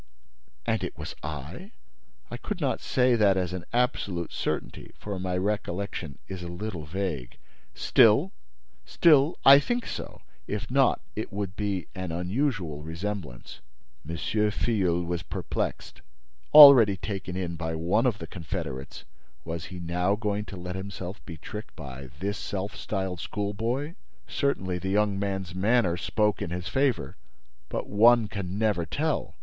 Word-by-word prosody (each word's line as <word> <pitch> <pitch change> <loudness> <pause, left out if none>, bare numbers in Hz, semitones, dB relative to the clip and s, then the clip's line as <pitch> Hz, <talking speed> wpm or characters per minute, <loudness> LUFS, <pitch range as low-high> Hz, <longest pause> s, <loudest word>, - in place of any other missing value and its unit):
"And - - 0
it - - -5
was - - -6
I?" 75 - -7 0.6
"I - - -4
could 210 -4 -5
not 140 -5 0
say 125 -1 +2
that 100 -4 +4
as 90 -1 -1
an 90 -2 -5
absolute 100 -8 0
certainty, - - -4
for 100 -3 -5
my 90 0 -2
recollection 95 -5 -3
is 95 -2 -6
a 85 - -6
little 85 -2 -5
vague. 85 -8 -4 0.4
Still—still, 65 - +3
I 140 +1 +10
think 240 +11 -2
so—if 105 +2 -7
not, 135 0 +3
it 110 +2 -4
would 100 -2 -4
be 100 -4 -2
an 95 -3 -5
unusual 90 - -1
resemblance—" 80 -4 -6 0.5
M. 85 - -3
Filleul 105 -4 +1
was 85 -1 -2
perplexed. - - -4 0.5
Already 135 -10 +10
taken 95 -2 -5
in 90 -2 -3
by 80 0 -3
one 90 +9 +2
of 115 -5 0
the - - -7
confederates, 80 -6 -6 0.4
was 85 0 -4
he 90 -1 -8
now 90 +3 0
going 105 -1 -2
to 95 0 -8
let 90 +1 -5
himself 95 0 -6
be 85 -3 -7
tricked 105 +7 -8
by 70 -3 -8
this 100 +2 -2
self 100 +1 -4
styled 95 -3 -3
schoolboy? 115 - -2 0.3
Certainly, 95 -11 -1
the 95 - -3
young 100 0 +2
man's 95 -3 -3
manner 95 -1 +2
spoke 105 +4 0
in - - -2
his 90 +1 -4
favor; 135 - 0 0.5
but - - -3
one 115 +2 +5
can 100 -2 -5
never 105 -5 +1
tell! 150 - -2
95 Hz, 145 wpm, -27 LUFS, 85-110 Hz, 0.6 s, I